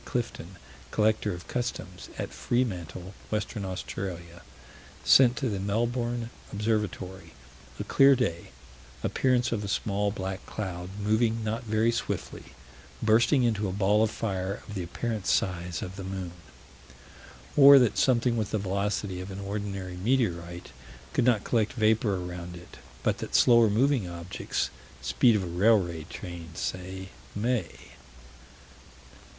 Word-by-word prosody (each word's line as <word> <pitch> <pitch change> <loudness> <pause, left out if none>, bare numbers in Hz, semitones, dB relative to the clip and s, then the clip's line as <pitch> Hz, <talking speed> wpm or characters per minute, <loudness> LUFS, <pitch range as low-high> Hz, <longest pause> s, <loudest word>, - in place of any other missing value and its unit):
Clifton, 115 -7 -4 0.3
Collector 110 -1 +1
of 85 -2 -7
Customs, 100 -7 -4
at - - -4
Freemantle, 95 -6 -2 0.2
Western 105 0 -2
Australia, 90 -2 -5 0.6
sent 125 -2 +6
to 135 - 0
the 100 -4 -2
Melbourne 120 +3 -1 0.2
Observatory 105 -3 -2 0.5
a - - -1
clear 135 0 +6
day 100 -10 -2 0.5
appearance 125 -2 +2
of 105 -3 -1
a - - -4
small 100 +1 0
black 95 -1 -4
cloud, 90 -4 -5
moving 110 +2 +1
not 110 +3 -2
very 110 +1 +2
swiftly 115 - -4 0.6
bursting 120 +5 +4
into 110 -3 +1
a - - -2
ball 100 +2 +3
of 110 - +3
fire, 100 -3 -3
of 105 - -8
the 95 - -3
apparent 105 +4 -3
size 90 -2 0
of 95 +1 -7
the 95 - -5
moon 95 -2 -5 1.2
Or 140 0 +10
that 125 -5 +4
something 120 -2 +3
with 110 -3 -1
the 110 - 0
velocity 100 -1 -2
of 95 - -7
an 95 0 -6
ordinary 100 -2 -4
meteorite 90 -6 -1 0.4
could 120 - +2
not 120 -5 +3
collect 110 -3 +1
vapor 110 -2 +2
around 90 -1 -6
it, 90 0 -12 0.3
but - - +1
that - - -4
slower 115 -2 +6
moving 120 -2 +2
objects 85 +1 -3 0.3
speed 65 - +3
of 100 - +1
a - - -3
railway 90 -3 +2
train, 85 -2 -8
say 95 +1 -4 0.3
may. 120 +3 0
100 Hz, 135 wpm, -28 LUFS, 90-115 Hz, 1.2 s, Or